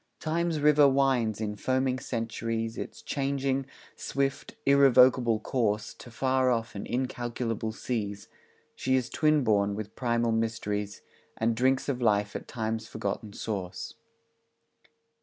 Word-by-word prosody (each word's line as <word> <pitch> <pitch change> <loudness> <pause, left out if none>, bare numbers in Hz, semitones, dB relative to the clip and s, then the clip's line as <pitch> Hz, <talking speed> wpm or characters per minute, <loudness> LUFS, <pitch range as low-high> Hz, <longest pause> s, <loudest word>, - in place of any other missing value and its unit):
Time's 165 0 -1
river 150 -1 +6
winds 130 -6 +2
in 105 -1 -3
foaming 130 +3 0
centuries 115 -2 -3
Its - - -7
changing, 135 -1 -1 0.3
swift, 140 0 -2
irrevocable 130 -4 +5
course 110 -3 -1
To - - -13
far 130 +2 +1
off 115 -2 -1
and 100 - -6
incalculable 120 -3 -2
seas; 105 -3 -4 0.5
She 130 0 +1
is 130 -2 -1
twin 155 -2 +3
born 100 -3 +2
with 105 0 -6
primal 120 -2 +1
mysteries, 105 -2 -2 0.3
And 115 0 +1
drinks 130 +3 +2
of 130 -3 -2
life 105 -3 +2
at - - -5
Time's 110 -1 -3
forgotten 110 -1 -4
source. 95 -5 -5
120 Hz, 125 wpm, -28 LUFS, 110-130 Hz, 0.5 s, river